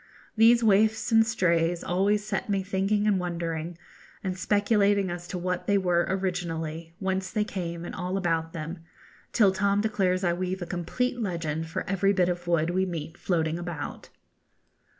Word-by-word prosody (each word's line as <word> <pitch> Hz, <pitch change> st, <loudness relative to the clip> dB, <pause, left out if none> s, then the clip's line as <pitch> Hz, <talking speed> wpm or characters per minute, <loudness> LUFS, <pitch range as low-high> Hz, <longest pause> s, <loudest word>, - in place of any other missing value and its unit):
These 230 Hz, +1 st, +6 dB
waifs 220 Hz, +2 st, +3 dB
and 225 Hz, 0 st, +6 dB
strays 170 Hz, -5 st, +1 dB
always 200 Hz, +3 st, +1 dB
set 215 Hz, -, -3 dB
me 195 Hz, -1 st, +1 dB
thinking 195 Hz, +2 st, 0 dB
and 205 Hz, -3 st, +3 dB
wondering, 170 Hz, -1 st, -3 dB, 0.5 s
and 185 Hz, -2 st, -2 dB
speculating 205 Hz, 0 st, +2 dB
as 175 Hz, 0 st, -6 dB
to 180 Hz, -, -4 dB
what 180 Hz, 0 st, -3 dB
they 205 Hz, -, +4 dB
were 175 Hz, -2 st, +2 dB
originally, 165 Hz, -3 st, -3 dB
whence 190 Hz, -1 st, -2 dB
they 210 Hz, -, 0 dB
came, 175 Hz, -5 st, -5 dB
and -, -, -6 dB
all 185 Hz, -1 st, -2 dB
about 165 Hz, -3 st, 0 dB
them, 165 Hz, +1 st, -6 dB, 0.5 s
till 205 Hz, -5 st, +5 dB
Tom 200 Hz, +1 st, +1 dB
declares 190 Hz, -3 st, +1 dB
I 175 Hz, -1 st, +2 dB
weave 185 Hz, +1 st, -3 dB
a -, -, -4 dB
complete 245 Hz, +9 st, -2 dB
legend 165 Hz, -5 st, -2 dB
for 160 Hz, -, -4 dB
every 195 Hz, +1 st, +2 dB
bit 180 Hz, -2 st, +2 dB
of 175 Hz, 0 st, -3 dB
wood 170 Hz, -1 st, +2 dB
we 185 Hz, +1 st, +1 dB
meet 165 Hz, -3 st, -4 dB
floating 165 Hz, -2 st, -1 dB
about. 170 Hz, -5 st, -6 dB
180 Hz, 170 wpm, -27 LUFS, 170-200 Hz, 0.5 s, These